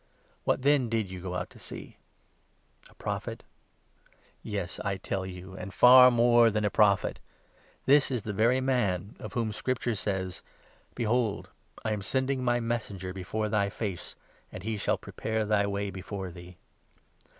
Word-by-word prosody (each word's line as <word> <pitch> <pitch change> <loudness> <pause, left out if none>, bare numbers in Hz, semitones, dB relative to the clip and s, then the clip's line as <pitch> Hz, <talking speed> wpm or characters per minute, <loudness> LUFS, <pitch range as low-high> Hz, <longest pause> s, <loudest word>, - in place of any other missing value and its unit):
What 130 - +1
then 140 -4 +3
did 110 -4 -1
you 95 -1 -7
go 90 0 -3
to - - -17
see? - - -9 0.9
A - - -21
Prophet? - - -4 1.0
Yes, 100 -4 -4
I 100 - -1
26 95 - -16
tell 95 -1 -1
you, 95 0 -9
and 95 +1 -7
far 125 +5 +9
more 120 -1 +5
than 105 -1 0
a 105 - +1
Prophet. 100 -2 +3 0.7
This 140 +1 +5
is 125 -6 -2
the 105 - -4
very 115 +5 +3
man 105 -8 0
27 - - -6
of 105 - -8
whom 115 -3 -1
Scripture 120 +2 -1
says 95 -3 -3 0.2
— - - -30
' - - -35
Behold, 115 -2 0 0.3
I 110 - 0
am 105 -1 -1
sending 130 +5 0
my 120 -1 +2
Messenger 105 -6 -3
before 100 +4 -3
thy 105 -2 +1
face, 100 -4 -5 0.4
And 90 - -8
he 110 +1 -2
shall 100 - 0
prepare 110 -1 -3
thy 105 -1 +2
way 100 0 -2
before 95 0 -6
thee.' 90 +1 -12
105 Hz, 170 wpm, -29 LUFS, 95-120 Hz, 1.0 s, far